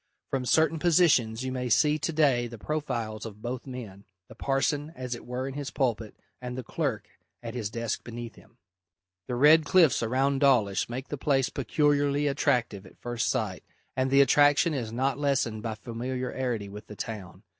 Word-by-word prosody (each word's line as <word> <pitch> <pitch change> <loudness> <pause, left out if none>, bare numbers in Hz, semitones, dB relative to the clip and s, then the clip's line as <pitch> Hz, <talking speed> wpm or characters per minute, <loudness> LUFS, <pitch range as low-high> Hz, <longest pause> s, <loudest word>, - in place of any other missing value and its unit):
From 130 -2 -1
certain 160 +2 +3
positions 150 -10 +3
you 130 - -3
may 125 -1 -3
see 150 +7 +3
to 160 - -1
day 140 -6 +2
the 115 0 -9
profiles 120 -6 -3
of 105 -2 -8
both 125 +2 -5
men, 110 -7 -8 0.3
the - - -11
parson 145 +2 -1
as 125 -1 -4
it 120 - -9
were 125 +2 -3
in 135 - -5
his 140 -1 -4
pulpit, 115 -6 -2 0.2
and 125 0 -5
the 130 - -4
clerk - - -3 0.4
at 115 -1 -5
his 115 -5 -3
desk 115 0 -3
beneath 120 -1 -7
him. - - -20 0.7
The 125 - -2
red 150 +5 +6
cliffs 165 -4 +4
around 135 +4 +1
Dawlish 120 -10 +3
make 130 +3 -5
the 145 - -5
place 135 -2 +2
peculiarly 145 +2 +1
attractive 120 -8 0
at - - -18
first 120 -1 -2
sight, - - -2 0.3
and 130 +1 +1
the 140 +1 +6
attraction 145 +3 +4
is 120 -6 -3
not 130 +3 -1
lessened 130 -6 0
by 110 -1 -3
familiarity 125 0 -3
with 105 +2 -10
the 105 - -9
town. 100 -4 -7
130 Hz, 180 wpm, -28 LUFS, 115-140 Hz, 0.7 s, red